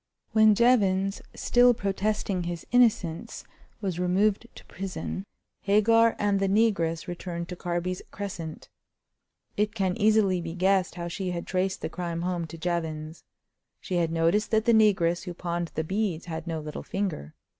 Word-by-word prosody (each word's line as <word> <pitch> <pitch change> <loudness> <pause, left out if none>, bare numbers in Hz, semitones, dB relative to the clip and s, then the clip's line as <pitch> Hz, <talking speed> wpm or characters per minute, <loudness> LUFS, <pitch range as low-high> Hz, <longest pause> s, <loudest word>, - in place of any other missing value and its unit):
When 215 -1 +6
Jevons, 195 -5 +3
still 245 0 +4
protesting 200 -3 -1
his 170 -1 -5
innocence, 225 -5 +2 0.4
was 185 -4 -2
removed 195 +5 +1
to - - -13
prison, 195 +1 -5 0.3
Hagar 225 +3 +4
and 205 -1 +1
the 195 - +1
negress 195 -6 +1
returned 175 -1 -5
to 180 - -5
Carby's 175 +1 -3
Crescent. 175 -6 -6 0.9
It 210 +1 0
can 190 -3 0
easily 205 -4 +3
be 165 0 -6
guessed 190 0 +2
how 170 -1 -4
she 180 +2 -3
had 175 -1 -4
traced 190 0 -1
the - - -2
crime 170 -2 -4
home 175 -2 -2
to 165 - -9
Jevons. 160 -2 -3 0.6
She 180 - -3
had 165 -2 +1
noticed 165 +6 +2
that 220 0 +2
the 235 - +4
negress 190 -5 +3
who 175 -2 -6
pawned 170 -1 -3
the 160 - 0
beads 190 -1 -2
had 165 -1 -6
no 165 -1 -2
little 150 0 -6
finger. 180 - -4
185 Hz, 155 wpm, -27 LUFS, 170-205 Hz, 0.9 s, When